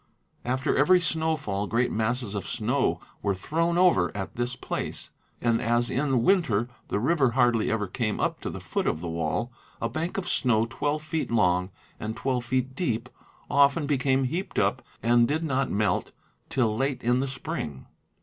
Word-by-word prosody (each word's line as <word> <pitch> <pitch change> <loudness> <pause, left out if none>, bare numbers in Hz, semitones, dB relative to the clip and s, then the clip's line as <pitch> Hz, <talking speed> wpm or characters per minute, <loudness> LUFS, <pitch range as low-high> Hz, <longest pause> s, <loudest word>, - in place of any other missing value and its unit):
After 130 +2 0
every 180 +6 +5
snowfall 155 - 0
great 120 +4 +1
masses 115 0 -1
of 100 - -4
snow - - 0 0.2
were 100 -1 0
thrown 165 - 0
over 175 - +4
at 95 - -5
this 120 +1 -1
place, - - -4 0.3
and, 115 -1 +1
as 120 +1 +1
in 135 -3 +1
winter 140 - +3 0.2
the - - -1
river 135 +1 +2
hardly 120 -3 +3
ever 110 -2 0
came 110 +2 -2
up - - -1
to - - -3
the - - -6
foot - - -2
of - - 0
the 85 - -5
wall, 85 +8 -2 0.3
a - - 0
bank 165 +4 -3
of 185 -2 -2
snow 115 -8 +2
twelve 145 +5 -2
feet 155 0 -2
long 90 -5 +2 0.3
and 110 +1 -4
twelve 125 -3 -1
feet 130 +1 -1
deep 120 -9 -1 0.4
often 140 +2 +4
became 135 -2 +2
heaped 165 +9 -3
up - - +2 0.2
and 120 0 +4
did 155 +4 -1
not 135 -3 0
melt 105 +1 0 0.4
till 115 -5 +1
late 135 +2 -1
in 125 +2 +3
the 135 - 0
spring. 130 - -5
125 Hz, 175 wpm, -27 LUFS, 110-145 Hz, 0.4 s, every